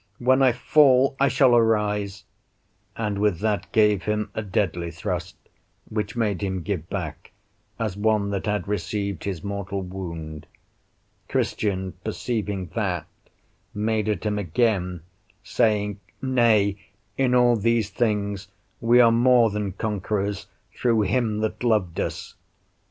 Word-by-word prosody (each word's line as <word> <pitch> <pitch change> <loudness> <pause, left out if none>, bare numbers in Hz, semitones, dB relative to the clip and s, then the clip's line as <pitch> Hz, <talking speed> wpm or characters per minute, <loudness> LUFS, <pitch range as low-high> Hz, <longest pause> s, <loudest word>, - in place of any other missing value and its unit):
when 130 +2 +3
I 130 -2 +6
fall 135 +1 +4
I 140 - +4
shall 130 -3 +4
arise;" 105 -3 +1 0.7
and 105 -3 -2
with 105 -5 +1
that 105 -4 -1
gave 105 -3 +3
him 105 0 -1
a - - -2
deadly 90 -4 -1
thrust, 85 +1 -4 0.5
which 105 -1 -3
made 105 -6 0
him 95 -3 -2
give 90 -5 -3
back, - - -5 0.5
as 110 -4 -2
one 105 -1 +1
that 100 +1 -3
had 105 0 -1
received 100 -1 -3
his 95 -5 -4
mortal 100 -1 -4
wound; 85 -5 -7 0.8
Christian, 95 -3 -1
perceiving 105 -4 -3
that, 90 -8 -1 0.7
made 110 0 0
at 105 -5 -1
him 105 -1 0
again, 90 -2 0 0.4
saying, 105 -3 +1 0.2
"Nay, 115 -7 +3 0.4
in 130 -2 +2
all 120 -1 +5
these 115 -1 +1
things 100 -4 -1 0.3
we 120 +1 +4
are 115 -2 +7
more 120 -1 +4
than 105 -1 -2
conquerors 105 -1 -2 0.3
through 115 -3 +2
him 110 0 0
that 110 +2 -3
loved 105 -8 +1
us." - - -4
105 Hz, 130 wpm, -24 LUFS, 95-115 Hz, 0.8 s, are